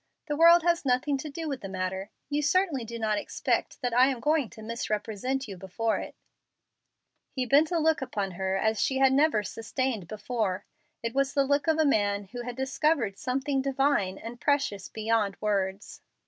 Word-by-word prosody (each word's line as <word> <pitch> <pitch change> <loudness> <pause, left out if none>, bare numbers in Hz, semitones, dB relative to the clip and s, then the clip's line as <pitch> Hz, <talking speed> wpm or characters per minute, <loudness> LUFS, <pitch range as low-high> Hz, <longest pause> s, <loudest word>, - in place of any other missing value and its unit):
The 295 -2 -2
world 335 +2 +7
has 345 0 +2
nothing 260 +2 +1
to 300 - -5
do 320 +3 -5
with 275 -3 -4
the 195 - -6
matter. 190 +1 -3 0.2
You 290 +1 0
certainly 300 -3 +1
do 230 +1 -6
not 215 -2 0
expect - - -1
I 245 +1 +4
am 265 -3 -1
going 295 -2 +1
to 220 - -12
misrepresent 230 +3 -3
you 195 -3 -7
before 195 +5 -1
it." - - -7 1.1
He 260 -2 -2
bent 285 +5 +4
a 345 - 0
look 320 -1 +2
upon 200 -7 -3
her 190 +1 -1
such 220 - +1
as 220 0 +1
she 265 - +1
had 265 0 +5
never 280 -6 +3
sustained 225 -1 -3
before. 215 -2 -2 0.4
It 230 0 -2
was 275 0 0
the 275 -1 +3
look 285 +2 +1
of 320 -1 +3
a 315 - +3
man 205 -6 +2
who 245 -1 -5
had 245 0 -6
discovered 265 -4 0
something 270 +2 -1
divine 270 -8 +1
and 235 +1 -9
precious 280 -10 0
beyond 220 -2 0
words. 200 -2 -2
250 Hz, 190 wpm, -28 LUFS, 210-285 Hz, 1.1 s, world